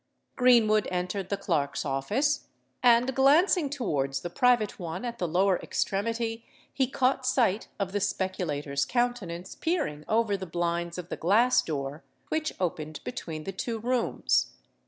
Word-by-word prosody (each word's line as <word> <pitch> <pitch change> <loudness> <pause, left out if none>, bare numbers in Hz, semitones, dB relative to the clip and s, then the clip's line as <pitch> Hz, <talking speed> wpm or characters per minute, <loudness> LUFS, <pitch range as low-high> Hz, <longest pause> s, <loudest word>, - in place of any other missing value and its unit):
Greenwood 225 -5 +4
entered 180 +1 -3
the 200 - -1
clerks' 165 -8 -1
office; 210 - 0 0.3
and, 245 +1 +4
glancing 290 +4 +4
towards 140 - -1
the 175 - -5
private 240 0 +2
one 170 +6 -5
at 235 -1 -5
the 175 - 0
lower 185 +3 +3
extremity, 225 +2 -2 0.3
he 265 -2 +1
caught 260 +1 +1
sight 235 -5 +1
of 195 -2 -1
the 205 - 0
speculator's 175 -8 -1
countenance 230 -8 -2
peering 305 - -2
over 220 -2 +2
the 190 -1 -5
blinds 170 0 -2
of 180 -1 -7
the - - -4
glass 225 +9 +4
door 145 0 -4 0.3
which 315 0 -1
opened 155 -4 -3
between 160 -10 -5
the 195 - -4
two 225 +4 -3
rooms. 240 +2 0
200 Hz, 145 wpm, -28 LUFS, 170-245 Hz, 0.3 s, Greenwood